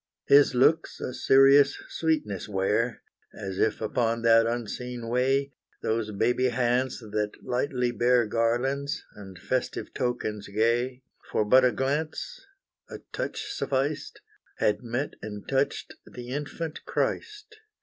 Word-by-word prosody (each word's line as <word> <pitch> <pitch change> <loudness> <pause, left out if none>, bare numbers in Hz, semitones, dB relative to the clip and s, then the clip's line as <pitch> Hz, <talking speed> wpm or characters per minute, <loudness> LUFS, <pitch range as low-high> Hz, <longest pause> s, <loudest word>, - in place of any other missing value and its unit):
His 140 -2 +6
looks 155 +6 +3
a 125 - -4
serious 135 +2 +5
sweetness 150 - -1
wear, 105 +4 0 0.3
As 95 -2 -5
if 110 0 +1
upon 115 +1 0
that 115 0 +5
unseen 120 0 -4
way, 135 +3 +1 0.3
Those 110 -1 -1
baby 120 +5 +1
hands 125 +1 0
that 105 -1 -2
lightly 125 -1 -1
bear 120 +1 +3
Garlands, 120 +6 0
and 95 -3 -11
festive 130 +7 -3
tokens 120 -5 -2
gay, 120 +5 0 0.3
For 105 - +1
but 130 +5 +6
a 125 - +4
glance, 155 - -2 0.5
a - - -7 0.2
touch 420 -1 -4
sufficed, 140 - -2 0.4
Had 105 -1 +1
met 120 +4 -3
and 105 -1 -7
touched 135 +1 -1 0.2
the 125 0 -9
infant 150 +4 -5
Christ! 430 0 -3
125 Hz, 125 wpm, -27 LUFS, 115-135 Hz, 0.5 s, His